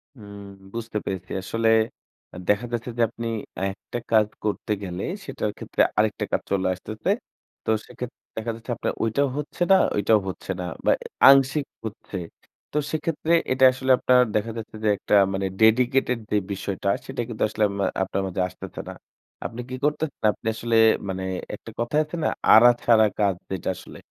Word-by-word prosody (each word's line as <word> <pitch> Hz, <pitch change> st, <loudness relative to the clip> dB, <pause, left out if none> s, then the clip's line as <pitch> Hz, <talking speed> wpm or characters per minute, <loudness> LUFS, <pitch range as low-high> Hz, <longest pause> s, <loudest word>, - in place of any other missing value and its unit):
উম 100 Hz, -3 st, -11 dB, 0.3 s
বুঝতে 115 Hz, -2 st, -4 dB
পেরেছি। 95 Hz, -1 st, -5 dB
আসলে 115 Hz, +2 st, +1 dB, 0.6 s
অ্যা -, -, -10 dB
দেখা 105 Hz, +4 st, +3 dB
যাচ্ছে 120 Hz, +1 st, -3 dB
যে -, -, +1 dB
আপনি 115 Hz, 0 st, -6 dB, 0.4 s
একটা 120 Hz, +4 st, -7 dB
কাজ 110 Hz, -2 st, +5 dB, 0.2 s
করতে 105 Hz, 0 st, -2 dB
গেলে, 90 Hz, 0 st, -4 dB, 0.2 s
সেটার 105 Hz, -, -3 dB
ক্ষেত্রে -, -, -1 dB, 0.2 s
আরেকটা 105 Hz, -1 st, +1 dB
কাজ -, -, +1 dB
চলে 95 Hz, -1 st, +1 dB
আসতেছে। 110 Hz, +4 st, -5 dB, 0.6 s
তো -, -, -2 dB, 0.2 s
সেক্ষেত্রে 125 Hz, -1 st, -8 dB, 0.2 s
দেখা 115 Hz, +1 st, -2 dB
যাচ্ছে 115 Hz, +2 st, -7 dB
আপনার -, -, -2 dB
ওইটাও 140 Hz, +6 st, +2 dB
হচ্ছে 150 Hz, +4 st, -6 dB
না, 190 Hz, -, +9 dB, 0.2 s
ওইটাও 105 Hz, +1 st, +4 dB
হচ্ছে 95 Hz, -, -5 dB
না -, -, -3 dB, 0.2 s
বা -, -, +5 dB
এ -, -, -4 dB, 0.2 s
আংশিক 135 Hz, +1 st, +5 dB, 0.2 s
হচ্ছে। 105 Hz, -2 st, -6 dB, 0.5 s
তো 150 Hz, -, -2 dB
সেক্ষেত্রে 160 Hz, +1 st, -1 dB, 0.2 s
এটা 130 Hz, 0 st, +5 dB
আসলে 130 Hz, 0 st, 0 dB
আপনার 125 Hz, 0 st, +4 dB
দেখা 110 Hz, +2 st, 0 dB
যাচ্ছে 110 Hz, -1 st, -7 dB
যে 105 Hz, -, +3 dB
একটা -, -, +1 dB, 0.2 s
মানে 95 Hz, 0 st, -1 dB, 0.2 s
ডেডিকেটেড 125 Hz, +2 st, +4 dB
যে 105 Hz, -, +3 dB, 0.2 s
বিষয়টা, 100 Hz, 0 st, -3 dB, 0.2 s
সেইটা 135 Hz, -2 st, -4 dB
কিন্তু 110 Hz, -, -2 dB
আসলে 110 Hz, 0 st, -1 dB
আম 100 Hz, -, -6 dB, 0.3 s
আপনার 95 Hz, +1 st, -2 dB
মধ্যে 95 Hz, 0 st, -2 dB
আসতেছে 90 Hz, -, -8 dB
না। -, -, -6 dB, 0.5 s
আপনি 120 Hz, +2 st, -4 dB
কি 130 Hz, -, -4 dB
করতেছেন? 150 Hz, 0 st, -1 dB
আপনি -, -, -9 dB
আসলে 115 Hz, +1 st, -1 dB, 0.3 s
মানে 95 Hz, 0 st, -3 dB, 0.3 s
একটা -, -, -11 dB
কথায় 150 Hz, +6 st, +2 dB
আছে 155 Hz, -, -7 dB
না? -, -, +3 dB, 0.2 s
আড়া-ছাড়া 115 Hz, -1 st, +6 dB
কাজ 100 Hz, -3 st, +3 dB, 0.2 s
যেটা 95 Hz, -, -2 dB
আসলে। -, -, -12 dB
110 Hz, 170 wpm, -24 LUFS, 100-125 Hz, 0.6 s, না